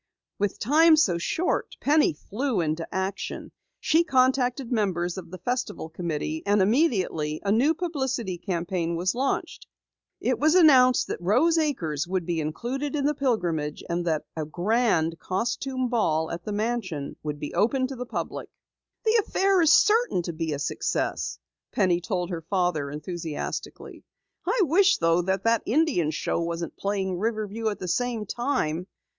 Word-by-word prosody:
With 205 -1 0
time 315 +7 +5
so 180 - +3
short, 330 - -1
Penny 300 +1 +3
flew 230 - -2
into 160 0 -1
action. 190 +2 -4 0.3
She 325 +2 +3
contacted 255 -2 +1
members 180 -6 0
of 190 - -8
the 185 - -8
Festival 245 -6 -3
Committee 160 -2 -3
and 205 +1 +2
immediately 190 - +1
a 200 - +2
new 270 +10 +3
publicity 265 - -2
campaign 170 -2 -2
was 180 +2 0
launched. 265 +3 -2 0.5
It - - 0
was 310 +3 +3
announced 260 -8 +6
that - - -5
Rose 285 - +3
Acres 170 - -1
would 185 -1 -1
be 170 -1 -1
included 250 - -3
in 285 -2 0
the 295 - +2
Pilgrimage 175 - -1
and 170 +1 -1
that 155 -2 0
a 160 - -2
grand 175 -1 +1
costume 250 +6 -2
ball 160 -10 0
at 170 +1 -6
the 210 - -3
mansion 205 -9 -2
would 150 -1 -4
be 145 - -5
open 255 +5 +2
to 265 +1 -5
the 250 0 -6
public. - - -5 0.6
"The 445 0 +4
affair 390 -2 +2
is 325 -2 +5
certain 420 - +4
to 170 - -4
be 160 0 -3
a 145 - -1
success," 145 - -2 0.3
Penny 180 -4 +2
told 180 0 -2
her 170 -2 -3
father 175 -5 -1
enthusiastically. 160 +1 -6 0.4
"I 445 +3 +2
wish 380 +5 +4
though 165 +1 +3
that 190 +2 -1
the 230 -1 +3
Indian 260 - +2
Show 160 - -1
wasn't 170 0 -4
playing 190 -2 -2
Riverview 220 0 -2
at 205 - -4
the 185 - -6
same 235 +3 -1
time. 190 - -1
200 Hz, 160 wpm, -26 LUFS, 170-260 Hz, 0.6 s, announced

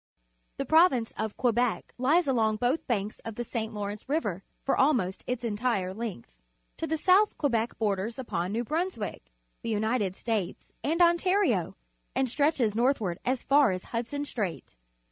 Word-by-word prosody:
— - - -44
The 275 - -2
Prov 325 +5 +6
ince 230 -3 -2
of 220 -1 -3
Quebec 245 -1 0
Ues 300 +6 +3
along 225 -5 +2
both 245 +8 0
banks 210 -3 -1
of 225 -1 -7
the 240 - -3
St. 225 -2 -3
Lawrence 205 +3 -5
River 205 - -1 0.2
for 275 - +1
almost 235 -10 +2
its 245 -1 -2
entire 210 -4 -1
length. 210 - -6 0.5
To 325 - -3
the 320 - 0
south 380 +6 +4
Quebec 235 -5 0
borders 210 +2 -1
upon 185 -8 -2
New 230 +3 -1
Brunswick, 335 +9 -3 0.3
the 230 - -4
United 215 -2 0
States, 215 -6 -3
and 330 +4 +3
Ontario, 345 - +2 0.4
and 265 - +2
stretches 270 -4 +1
northward 225 -7 +1
as 255 0 -1
far 280 -2 +5
as 185 -1 -2
Hudson 245 +5 -2
Strait. 200 - -4
235 Hz, 165 wpm, -28 LUFS, 210-280 Hz, 0.5 s, Prov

